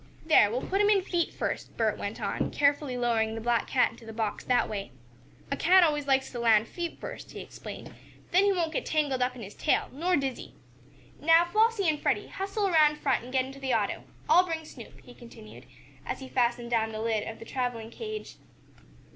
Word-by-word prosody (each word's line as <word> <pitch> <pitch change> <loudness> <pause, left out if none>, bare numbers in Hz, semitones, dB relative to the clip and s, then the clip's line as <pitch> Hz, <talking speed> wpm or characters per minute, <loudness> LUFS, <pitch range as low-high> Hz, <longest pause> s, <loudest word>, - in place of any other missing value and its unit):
"There, 310 -10 +6
we'll 245 +4 -2
put 390 +2 +1
him 415 - +4
in 400 -3 +4
feet 345 -3 -1
first," - - -4
Bert - - +1
went - - -5
on, - - -2
carefully 285 -2 +1
lowering 225 -2 +1
the - - -4
black 235 0 +1
cat 255 - +2
into - - -16
the 225 - -8
box 220 -1 -3
that 250 -1 +2
way. 200 -2 -5 0.6
"A - - +1
cat 365 +5 +5
always 295 -3 +1
likes 265 -1 +2
to 245 - -5
land 225 -1 +4
feet 345 -1 -5
first," - - -8
he - - -7
explained, - - -9 0.4
"then 370 +2 +5
he 405 - +4
won't 335 -4 -1
get - - -1
tangled 290 -5 0
up 250 0 0
in 240 - -8
his 200 +1 -9
tail, - - 0
nor 345 +7 0
dizzy. 270 -4 -3 0.6
Now, 330 +2 +5
Flossie 430 +2 +2
and 305 -2 +1
Freddie, - - 0
hustle 395 +1 -2
around 305 -4 +4
front 265 -5 0
and 250 - -10
get 260 -1 +1
into 270 +1 -10
the 265 -3 0
auto. 210 -3 -1 0.2
I'll 345 +4 +6
bring 325 -3 -4
Snoop" 245 -6 -12
he 245 - -14
continued, 230 -3 -13 0.4
as - - -4
he 265 - -8
fastened 240 -1 0
down 225 -1 +1
the 215 - -5
lid 220 -1 -1
of 225 - -6
the - - -11
traveling 240 -3 -3
cage. 430 -1 -7
265 Hz, 215 wpm, -28 LUFS, 235-335 Hz, 0.6 s, There